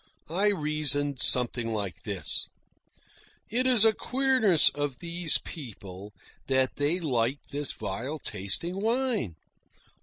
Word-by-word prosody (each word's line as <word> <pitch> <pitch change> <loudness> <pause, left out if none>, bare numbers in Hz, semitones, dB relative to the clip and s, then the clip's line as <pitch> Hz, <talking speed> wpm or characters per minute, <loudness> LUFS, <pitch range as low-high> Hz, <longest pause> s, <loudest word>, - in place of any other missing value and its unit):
I 195 +5 +1
reasoned 150 -6 +1
something 120 -3 +3
like 100 -4 -4
this: - - -3 1.0
It 250 +3 +2
is 240 -4 +5
a 220 - +5
queerness 255 - +3
of 145 -2 -4
these 170 0 +2
people 100 - -10 0.4
that 130 -1 +1
they 145 +5 +1
like 130 -5 0
this 145 -1 -1
vile 115 +9 -5
tasting 135 - -1
wine. 225 - -1
145 Hz, 115 wpm, -27 LUFS, 120-195 Hz, 1.0 s, is